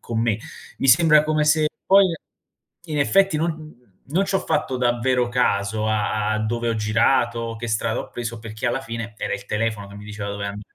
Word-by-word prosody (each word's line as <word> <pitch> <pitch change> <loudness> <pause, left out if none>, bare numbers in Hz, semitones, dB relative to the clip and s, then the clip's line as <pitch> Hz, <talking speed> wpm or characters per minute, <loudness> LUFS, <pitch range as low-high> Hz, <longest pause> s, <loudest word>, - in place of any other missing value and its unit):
con 115 -1 -3
me. 115 -3 +1 0.4
Mi 135 - 0
sembra 155 +1 +6
come 155 0 +1
se 155 0 +3 0.2
poi, 195 0 +6 0.8
in 155 -2 -3
effetti, 195 +5 +3
non 155 -5 -4 0.2
non 170 +7 +1
c'ho 195 0 0
fatto 130 - -1
davvero 125 0 +1
caso 110 -3 0
a 105 0 0
a - - +2
a - - -1
dove 115 +2 -1
ho 115 - 0
girato, 115 +1 +1
che 120 +1 -5
strada 110 +1 -1
ho - - -9
preso 120 -1 -5
perché, 110 +2 -5
alla 120 +2 0
fine, 115 -3 -6
era 105 - -3
il - - -8
telefono 105 -1 -2
che 100 - -12
mi 105 - -10
diceva 105 -1 -6
dove 100 0 -4
an 100 +1 -5
115 Hz, 200 wpm, -22 LUFS, 110-145 Hz, 0.8 s, sembra